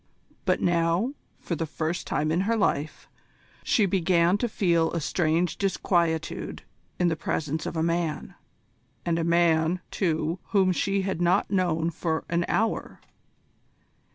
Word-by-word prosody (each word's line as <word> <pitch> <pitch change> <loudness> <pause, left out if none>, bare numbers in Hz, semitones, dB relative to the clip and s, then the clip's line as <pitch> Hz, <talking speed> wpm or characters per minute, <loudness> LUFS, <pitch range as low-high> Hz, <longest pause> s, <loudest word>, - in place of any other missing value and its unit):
But - - +1
now, 170 +8 +1 0.2
for 170 - -4
the 165 +1 -3
first 160 +3 -3
time 155 +1 0
in 170 +3 +2
her 230 - +2
life, 155 -7 -1 0.6
she 215 - +3
began 180 -1 +3
to 240 - 0
feel 170 -6 +2
a 170 - 0
strange 165 +2 0
disquietude 170 -4 -1 0.3
in 180 - +2
the 165 - +1
presence 155 0 -2
of - - -4
a 160 - +1
man, 165 -2 -1 0.7
and 170 -1 +1
a - - 0
man, 170 0 +3
too, 165 -1 -1
whom 190 -3 +3
she 195 +2 0
had 190 -3 -2
not 175 +2 +2
known 170 -4 +1
for 160 -1 -2
an 170 0 +1
hour. 225 0 -1
170 Hz, 145 wpm, -26 LUFS, 160-185 Hz, 0.7 s, she